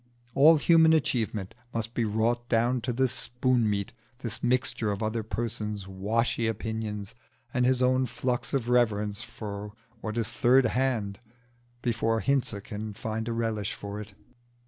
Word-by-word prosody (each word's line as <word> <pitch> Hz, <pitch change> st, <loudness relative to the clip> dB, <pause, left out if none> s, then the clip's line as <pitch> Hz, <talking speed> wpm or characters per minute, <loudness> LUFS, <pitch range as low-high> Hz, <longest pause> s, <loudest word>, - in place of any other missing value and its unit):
All 155 Hz, +4 st, +7 dB
human 160 Hz, +1 st, +5 dB
achievement 110 Hz, -9 st, 0 dB, 0.2 s
must 115 Hz, 0 st, -2 dB
be 120 Hz, -, 0 dB
wrought 115 Hz, +3 st, 0 dB
down 120 Hz, +2 st, +2 dB
to 120 Hz, -, -2 dB
this 130 Hz, +1 st, +1 dB
spoon 125 Hz, -2 st, +1 dB
meat 100 Hz, +2 st, -2 dB, 0.3 s
this 115 Hz, -2 st, -3 dB
mixture 120 Hz, -3 st, +2 dB
of 100 Hz, +2 st, -3 dB
other 110 Hz, +1 st, -1 dB
persons' 105 Hz, -3 st, -3 dB
washy 110 Hz, +5 st, 0 dB
opinions 110 Hz, -1 st, -3 dB, 0.4 s
and 125 Hz, 0 st, +2 dB
his 130 Hz, 0 st, +2 dB
own 130 Hz, 0 st, +3 dB
flux 125 Hz, -1 st, -2 dB
of 130 Hz, -5 st, 0 dB
reverence 105 Hz, -4 st, +2 dB
for 105 Hz, -2 st, -7 dB, 0.3 s
what 110 Hz, 0 st, -4 dB
is 115 Hz, 0 st, 0 dB
third 125 Hz, +2 st, +5 dB
hand, 115 Hz, -6 st, 0 dB, 0.6 s
before 115 Hz, -1 st, +1 dB
Hinze 125 Hz, -4 st, +1 dB
can 105 Hz, -1 st, -6 dB
find 110 Hz, +1 st, -3 dB
a -, -, -1 dB
relish 115 Hz, -3 st, -1 dB
for 100 Hz, +1 st, -6 dB
it. 105 Hz, -1 st, -11 dB
115 Hz, 150 wpm, -28 LUFS, 105-125 Hz, 0.6 s, All